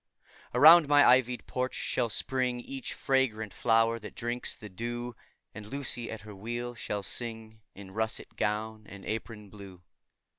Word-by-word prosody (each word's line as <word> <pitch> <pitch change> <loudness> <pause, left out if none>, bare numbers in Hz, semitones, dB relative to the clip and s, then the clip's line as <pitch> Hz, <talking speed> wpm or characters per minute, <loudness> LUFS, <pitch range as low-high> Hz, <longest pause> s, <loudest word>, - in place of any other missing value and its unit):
Around 155 +4 +9
my 145 0 +6
ivy'd 125 0 +4
porch 130 0 -2
shall 120 -2 -1
spring 125 +2 -1
Each 135 +2 -6
fragrant 120 -7 0
flower 115 0 +3
that 105 - -10
drinks 120 +1 -3
the 110 - -10
dew; 120 +4 -5 0.4
And 105 0 -9
Lucy, 125 -2 -3
at 110 - -6
her 105 0 -10
wheel, 120 +4 -4
shall 105 -2 -4
sing 110 -1 -5
In 95 -1 -11
russet 110 +2 -3
gown 110 +1 -2
and 100 -1 -11
apron 105 -2 -5
blue. 95 -4 -12
115 Hz, 150 wpm, -30 LUFS, 105-125 Hz, 0.4 s, Around